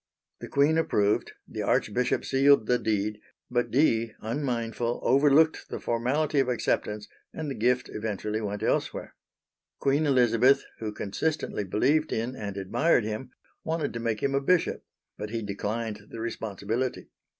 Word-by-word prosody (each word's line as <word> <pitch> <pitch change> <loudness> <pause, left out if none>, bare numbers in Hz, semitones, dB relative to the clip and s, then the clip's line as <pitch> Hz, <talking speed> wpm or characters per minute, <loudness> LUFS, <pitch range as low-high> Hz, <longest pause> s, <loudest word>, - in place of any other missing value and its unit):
The - - -7
Queen 150 +3 +3
approved, 105 -9 +1
the - - -5
Archbishop 125 +4 +1
sealed 135 -2 +4
the 125 +2 +2
deed; 105 0 -1 0.3
but 120 0 +1
Dee, 115 -5 +2
unmindful, 120 -1 -2
overlooked 145 +4 +4
the - - -4
formality 140 +6 0
of 135 -2 +2
acceptance 105 -3 -1 0.3
and 155 -3 -4
the - - -1
gift 125 +1 +1
eventually 105 0 -3
went 105 0 -4
elsewhere. - - -1 0.6
Queen 140 +3 +1
Elizabeth, 125 0 +4 0.2
who 110 -1 -3
consistently 105 +4 -2
believed 145 - +1
in 115 +3 -2
and 100 -4 -5
admired 120 - +2
him, 110 +4 -4 0.3
wanted 160 -2 -2
to 115 - -4
make 115 -2 -2
him 135 - +1
a 140 - +2
bishop, 175 +4 +1 0.4
but 105 - -4
he 115 0 -3
declined 105 +1 -4
the 115 - -8
responsibility. 115 +2 -3
120 Hz, 145 wpm, -27 LUFS, 105-140 Hz, 0.6 s, sealed